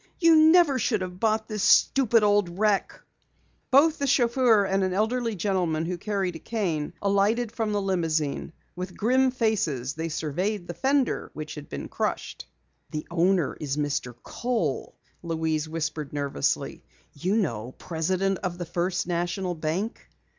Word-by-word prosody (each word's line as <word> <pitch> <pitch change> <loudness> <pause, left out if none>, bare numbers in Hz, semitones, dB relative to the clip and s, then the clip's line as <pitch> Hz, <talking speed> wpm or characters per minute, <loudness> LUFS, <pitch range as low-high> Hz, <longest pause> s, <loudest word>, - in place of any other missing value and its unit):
You 330 -2 +6
never 315 -3 +6
should 215 -3 0
have 180 0 -6
bought 220 0 +1
this 215 -2 -4
stupid 235 0 +4
old 205 -4 +2
wreck!" 210 -1 +1 0.7
Both 300 +4 +5
the 280 - 0
chauffeur 240 -5 +4
and 195 0 +1
an 185 -1 0
elderly 230 +2 0
gentleman 175 -4 0
who 175 +1 -3
carried 195 -4 -2
a - - -7
cane, 170 -10 -2
alighted 205 +4 +2
from 225 -2 -2
the 205 -1 0
limousine. 165 -6 -1 0.2
With 180 0 -6
grim 260 +4 +3
faces 200 - -1
they 160 +2 -4
surveyed 175 +6 -2
the 175 - -4
fender 270 +4 0
which 155 0 -6
had 150 -1 -9
been - - -5
crushed. - - -3 0.4
"The 150 0 -5
owner 175 -2 +2
is 145 -2 -3
Mr. 145 -4 -2
Kohl," 230 - -2 0.3
Louise 160 -2 -2
whispered 155 -2 -4
nervously. 140 - -2 0.3
"You 180 +8 -1
know, 125 - -2
president 185 +3 -1
of 180 -2 -4
the 175 - -4
First 175 +2 -1
National 175 +1 -2
Bank." 165 +7 -3
185 Hz, 150 wpm, -26 LUFS, 160-220 Hz, 0.7 s, You